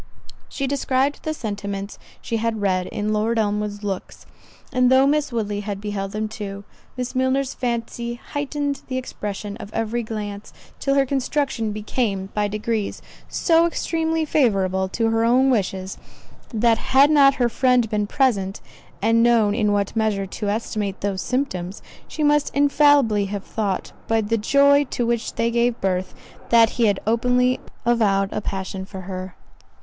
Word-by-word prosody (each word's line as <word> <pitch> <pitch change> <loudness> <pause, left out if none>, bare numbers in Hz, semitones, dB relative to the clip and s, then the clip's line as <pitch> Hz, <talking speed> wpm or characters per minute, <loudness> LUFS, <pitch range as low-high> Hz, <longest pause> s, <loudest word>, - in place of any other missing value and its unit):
She 275 - -3
described 275 0 0
the 310 - -2
sentiments 200 -4 -5 0.2
she 230 - -1
had 225 0 -1
read 185 -3 0
in 210 +1 -2
Lord 220 +2 0
Elmwood's 210 -1 -1
looks; 195 -2 -5 0.5
and 255 0 +3
though 260 +1 +6
Miss 295 0 +1
Woodley 210 -3 -2
had 205 -1 -4
beheld 200 -1 -4
them 215 +1 -2
too, 200 -2 -7 0.3
Miss 250 0 -3
Milner's 260 +1 +1
fancy 235 -1 -3
heightened 285 +2 -3
the 255 - -3
expression 205 -5 -5
of 205 - -9
every 225 +1 -1
glance, 210 -2 -6 0.3
till 275 0 +1
her 275 -1 +4
construction 265 -4 -1
became, 210 -2 -2
by 210 -1 +1
degrees, 215 0 -3 0.3
so 335 0 +3
extremely 325 -1 -1
favourable 190 -10 +1
to 225 +3 0
her 225 0 +2
own 255 +3 +4
wishes, 190 -4 -2 0.5
that 230 0 +2
had 275 +3 +4
not 275 -2 +6
her 245 -3 +2
friend 250 0 +2
been 210 -1 -1
present, 205 -7 +1 0.4
and 230 +1 +4
known 230 -3 +4
in 210 -2 +1
what 200 +1 0
measure 215 -3 0
to 200 +2 -4
estimate 205 -2 -2
those 195 -2 -1
symptoms, 205 -8 -3 0.2
she 310 - -3
must 295 0 +3
infallibly 285 -7 +4
have 200 0 -4
thought, 205 -4 -3 0.2
by 225 0 +2
the 220 +1 0
joy 280 +5 +5
to 245 -2 -2
which 235 -1 -1
they 230 0 +1
gave 235 0 +1
birth, 185 -1 -1 0.3
that 230 -1 +6
he 235 -2 +2
had 205 - +1
openly 250 +3 +2 0.3
avowed 205 -5 +2
a 210 - -2
passion 190 -1 -4
for 190 0 -8
her. 185 0 -6
225 Hz, 160 wpm, -22 LUFS, 205-255 Hz, 0.5 s, though